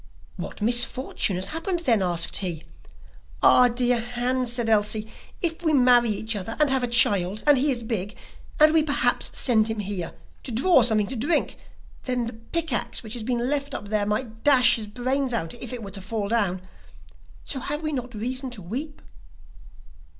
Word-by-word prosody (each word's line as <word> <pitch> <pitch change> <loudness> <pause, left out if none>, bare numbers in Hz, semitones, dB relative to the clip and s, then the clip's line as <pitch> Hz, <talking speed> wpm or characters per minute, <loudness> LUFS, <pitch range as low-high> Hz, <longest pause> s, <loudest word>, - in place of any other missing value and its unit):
'What - - -7
misfortune 240 -3 +1
has 185 +2 -2
happened 335 +2 -3
then?' 235 - +2
asked 175 -2 0
he. 170 -5 -3 0.8
'Ah, 250 - +7
dear 245 0 +1
Hans,' 245 +1 -1
said 240 -1 -1
Elsie, 215 0 +1 0.4
'if 330 0 -1
we 320 -2 +1
marry 245 -3 +5
each 220 +1 -1
other 205 +3 -5
and 300 -3 +3
have 265 -1 +2
a 245 - 0
child, 210 -4 +2
and 295 -1 +6
he 275 +3 +1
is 240 -4 -1
big, 215 -1 -4 0.4
and 305 +1 +6
we 320 - +5
perhaps 295 -2 +1
send 225 -4 +3
him 220 0 -3
here 195 -4 -4 0.3
to 255 - -7
draw 265 +6 +4
something 220 -3 +4
to 260 - -5
drink, 285 +9 0 0.5
then 250 -2 -1
the 230 - -6
pick 280 +7 -3
axe 230 - -2
which 220 -1 -6
has 240 - -4
been 240 +1 -1
left 280 0 -2
up 205 - -6
there 210 -1 0
might 225 +1 -3
dash 255 -4 +5
his 215 -2 -5
brains 255 +4 -2
out 165 -8 -2
if 240 -1 -4
it 245 -3 -5
were 200 - -8
to 195 0 -8
fall 210 +1 -3
down, 200 -5 0 0.8
so 270 - -4
have 295 +4 -4
we 310 - -1
not 250 -4 -5
reason 255 +5 -4
to 240 -5 -8
weep? 275 - -6
240 Hz, 190 wpm, -24 LUFS, 215-265 Hz, 0.8 s, Ah